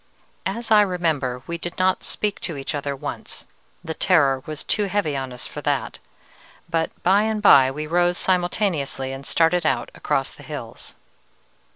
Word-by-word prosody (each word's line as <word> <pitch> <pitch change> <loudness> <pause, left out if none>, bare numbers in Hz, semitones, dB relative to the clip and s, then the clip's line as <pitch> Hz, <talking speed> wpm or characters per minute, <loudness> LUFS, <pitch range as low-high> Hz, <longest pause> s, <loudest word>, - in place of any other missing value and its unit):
"As 235 0 -4
I 215 -1 +8
remember, 160 -10 0
we 170 0 -4
did 175 0 -5
not 185 0 +2
speak 210 -1 -2
to 165 -5 -5
each 135 +3 -4
other 140 -1 -2
once: 135 - -6 0.4
the 160 -2 -4
terror 140 -8 +3
was 155 -1 -5
too 210 - 0
heavy 195 -6 0
on 135 -1 -3
us 125 -1 -7
for - - -7
that, - - -1 0.7
but 165 -1 0
by 195 +3 +5
and 220 0 0
by 135 -10 +7
we 150 +3 -4
rose 175 +2 +2
simultaneously 175 -7 0
and 135 +1 -8
started 170 +1 +3
out 155 - 0
across - - -1
the - - -15
hills. - - -8
165 Hz, 170 wpm, -23 LUFS, 140-185 Hz, 0.7 s, I